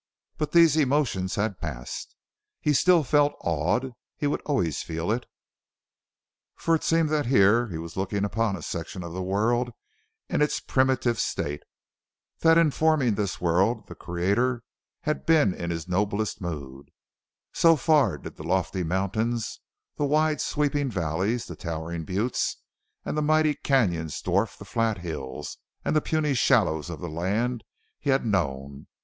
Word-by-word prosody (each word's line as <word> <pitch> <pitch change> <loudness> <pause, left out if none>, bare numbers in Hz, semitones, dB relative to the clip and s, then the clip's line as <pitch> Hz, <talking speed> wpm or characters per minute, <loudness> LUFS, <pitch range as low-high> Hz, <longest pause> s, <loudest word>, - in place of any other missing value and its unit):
But 150 -1 -1
these 165 -2 +6
emotions 130 -10 +1
had 100 -3 -1
passed. 65 -6 -6 0.4
He 150 - +1
still 170 +4 +5
felt 145 +2 +3
awed 85 - 0 0.2
he - - -2
would 145 - 0
always 90 - 0
feel 80 +4 -3
it, 120 +2 -2 1.3
for 165 - 0
it 160 - +1
seemed 165 -1 +2
that 150 -4 0
here 115 0 +4
he 85 -6 -5
was 80 0 -7
looking 100 +1 -1
upon 110 0 0
a 85 - -8
section 85 +1 -5
of 85 -1 -7
the 95 - -4
world 110 +6 +1 0.6
in - - 0
its 150 - +2
primitive 130 -3 +1
state; 75 0 -2 0.8
that 165 0 +5
in 165 -3 +4
forming 155 -6 +2
this 100 -2 -2
world 90 +7 +1
the - - -8
creator 100 +8 0 0.4
had 155 -2 -2
been 155 - +4
in 85 -1 -5
his 85 -1 -4
noblest 100 +3 -1
mood 70 -6 -6 0.6
so 165 -1 +5
far 150 -1 +3
did - - -10
the - - -8
lofty 95 0 0
mountains, 100 +7 -1 0.4
the 145 - +1
wide, 155 +1 +2
sweeping 145 -1 0
valleys, 95 +4 -1
the 85 - -8
towering 80 +1 -5
buttes, 105 +8 -1 0.5
and - - -3
the 150 - +1
mighty 155 0 +3
canyons 90 - 0
dwarf 100 +4 0
the 100 - -10
flat 115 +1 0
hills 80 -7 -6 0.3
and - - +1
the 155 - +4
puny 155 -2 0
shallows 80 - +2
of - - -7
the - - -4
land 105 +9 -1 0.4
he 145 - -3
had 135 -2 +2
known. 70 -9 -2
110 Hz, 155 wpm, -26 LUFS, 85-145 Hz, 1.3 s, these